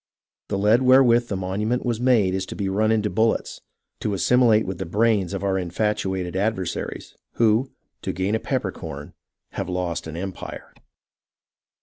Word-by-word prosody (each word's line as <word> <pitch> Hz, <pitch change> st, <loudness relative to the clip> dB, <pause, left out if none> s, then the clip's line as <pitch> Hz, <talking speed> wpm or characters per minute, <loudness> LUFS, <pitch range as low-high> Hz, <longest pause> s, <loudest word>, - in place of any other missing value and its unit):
The 100 Hz, -, -2 dB
lead 105 Hz, +5 st, +4 dB
wherewith 125 Hz, -2 st, +5 dB
the 100 Hz, -, -3 dB
monument 105 Hz, +7 st, -2 dB
was 120 Hz, -2 st, -1 dB
made 115 Hz, -7 st, +3 dB
is 95 Hz, 0 st, -2 dB
to -, -, -7 dB
be 100 Hz, -, -2 dB
run 110 Hz, +3 st, +1 dB
into 110 Hz, -1 st, +2 dB
bullets, 110 Hz, +2 st, 0 dB, 0.4 s
to 105 Hz, -, -1 dB
assimilate 115 Hz, 0 st, +4 dB
with 95 Hz, -2 st, -5 dB
the 95 Hz, -, -3 dB
brains 105 Hz, -1 st, +2 dB
of 100 Hz, 0 st, -4 dB
our 95 Hz, -1 st, +1 dB
infatuated 95 Hz, 0 st, -2 dB
adversaries, 95 Hz, -3 st, -3 dB, 0.2 s
who, 115 Hz, +3 st, +2 dB, 0.3 s
to -, -, -2 dB
gain 95 Hz, +4 st, -1 dB
a 110 Hz, -, +1 dB
peppercorn, -, -, -4 dB, 0.4 s
have -, -, -4 dB
lost 85 Hz, -2 st, -2 dB
an 80 Hz, +1 st, -6 dB
empire. 95 Hz, +1 st, -7 dB
105 Hz, 155 wpm, -23 LUFS, 95-115 Hz, 0.4 s, wherewith